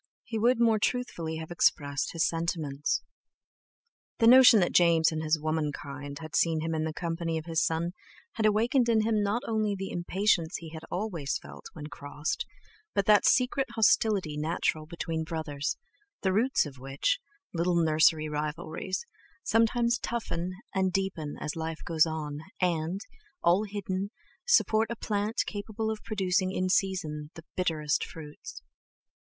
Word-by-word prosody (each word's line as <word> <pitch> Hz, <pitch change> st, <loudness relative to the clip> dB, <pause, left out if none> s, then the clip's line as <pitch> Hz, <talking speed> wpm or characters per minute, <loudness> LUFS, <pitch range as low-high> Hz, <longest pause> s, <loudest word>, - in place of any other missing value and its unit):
he 225 Hz, -2 st, -4 dB
would 235 Hz, +2 st, +3 dB
more 225 Hz, -2 st, +4 dB
truthfully 190 Hz, -10 st, -1 dB
have 160 Hz, +1 st, -7 dB
expressed 145 Hz, -4 st, +1 dB
his 165 Hz, -1 st, +2 dB
sentiments. 160 Hz, -4 st, -1 dB, 1.1 s
The 230 Hz, -, +3 dB
notion 250 Hz, -1 st, +9 dB
that 175 Hz, -, +2 dB
James 165 Hz, -2 st, +5 dB
and 155 Hz, -1 st, -2 dB
his 155 Hz, 0 st, +1 dB
womankind 145 Hz, -2 st, -3 dB
had 155 Hz, -1 st, -6 dB
seen 165 Hz, -2 st, +2 dB
him 165 Hz, +1 st, -2 dB
in 155 Hz, 0 st, -1 dB
the 160 Hz, -, -2 dB
company 165 Hz, 0 st, -2 dB
of 160 Hz, -, -5 dB
his 165 Hz, -1 st, 0 dB
son 165 Hz, +2 st, 0 dB, 0.4 s
had 220 Hz, -1 st, +1 dB
awakened 235 Hz, +4 st, +2 dB
in 225 Hz, -2 st, +4 dB
him 215 Hz, -1 st, +1 dB
not 205 Hz, +4 st, 0 dB
only 215 Hz, -2 st, 0 dB
the 195 Hz, 0 st, -5 dB
impatience 175 Hz, -1 st, +1 dB
he 165 Hz, -1 st, -9 dB
always 180 Hz, -8 st, -2 dB
felt -, -, -11 dB
when 150 Hz, -, -8 dB
crossed, 150 Hz, -, -4 dB, 0.5 s
but 200 Hz, -, +2 dB
that 210 Hz, 0 st, +5 dB
secret 255 Hz, +2 st, +3 dB
hostility 205 Hz, -7 st, +3 dB
natural 155 Hz, 0 st, -1 dB
between 165 Hz, -1 st, -3 dB
brothers, 155 Hz, -3 st, -3 dB, 0.5 s
the 190 Hz, -1 st, +2 dB
roots 240 Hz, +3 st, +2 dB
of 140 Hz, -3 st, -9 dB
which—little 180 Hz, -, -2 dB
nursery 155 Hz, -1 st, +4 dB
rivalries—sometimes 215 Hz, -, -1 dB
toughen 180 Hz, -7 st, -3 dB, 0.2 s
and 190 Hz, -1 st, +1 dB
deepen 180 Hz, -6 st, -2 dB
as 150 Hz, -, -4 dB
life 160 Hz, 0 st, -4 dB
goes 165 Hz, -1 st, +3 dB
on, 150 Hz, -2 st, -4 dB, 0.2 s
and, 175 Hz, +1 st, 0 dB, 0.4 s
all 180 Hz, +5 st, +4 dB
hidden, 200 Hz, -1 st, -3 dB, 0.4 s
support 225 Hz, -, +4 dB
a 235 Hz, -, -3 dB
plant 210 Hz, 0 st, -1 dB
capable 220 Hz, +1 st, -3 dB
of 215 Hz, -1 st, -6 dB
producing 185 Hz, -3 st, 0 dB
in 185 Hz, -1 st, -1 dB
season 160 Hz, -6 st, 0 dB
the 165 Hz, -, -11 dB
bitterest 155 Hz, -4 st, 0 dB
fruits. 150 Hz, -, -9 dB
175 Hz, 145 wpm, -29 LUFS, 155-215 Hz, 1.1 s, notion